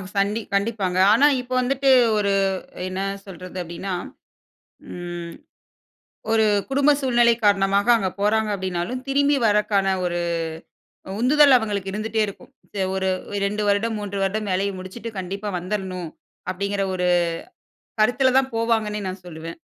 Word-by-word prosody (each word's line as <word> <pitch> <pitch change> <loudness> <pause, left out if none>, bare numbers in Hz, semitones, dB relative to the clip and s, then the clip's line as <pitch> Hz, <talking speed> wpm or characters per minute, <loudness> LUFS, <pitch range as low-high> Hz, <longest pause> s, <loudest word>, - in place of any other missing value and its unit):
சண்டி 200 +3 +1
கண்டிப்பாங்க. 200 -3 0 0.2
ஆனா 270 +6 +5 0.2
இப்போ 250 +1 -7
வந்துட்டு 270 +2 +1 0.3
ஒரு 200 -1 +1 0.6
என்ன 185 +1 -4 0.2
சொல்றது 185 -1 -9
அப்டின்னா, 175 +3 -5 1.0
ம். 175 -1 -6 1.0
ஒரு 220 -1 +4 0.3
குடும்ப 280 +2 +4
சூழ்நிலை 240 -3 +4
காரணமாக 200 +1 +3
அங்க 195 -4 -1
போறாங்க 215 +1 +2
அப்டின்னாலும், 190 +6 -3
திரும்பி 285 +1 +3
வரக்கான 205 -2 +2
ஒரு 175 -1 -1 1.0
உந்துதல் 280 +2 +6
அவங்களுக்கு 205 -4 -3
இருந்துட்டே 220 +2 -1
இருக்கும். 200 - -11 0.2
தே 200 - -1
ஒரு 190 0 0 0.4
2 210 +1 -1
வருடம், 220 +3 +1
3 200 -1 -5
வருடம் 205 +2 -1
வேலைய 195 +2 0
முடிச்சிட்டு, 205 +5 -7
கண்டிப்பா 195 +3 -4
வந்திரணும் 185 -2 -4 0.4
அப்டிங்கிற 200 +1 -2
ஒரு 180 -1 0 0.9
கருத்துல 250 +4 +3
தான் 265 -1 0
போவாங்கன்னே 220 -2 0
நான் 185 0 -7
சொல்லுவேன். 165 0 -8
200 Hz, 125 wpm, -23 LUFS, 190-230 Hz, 1.0 s, உந்துதல்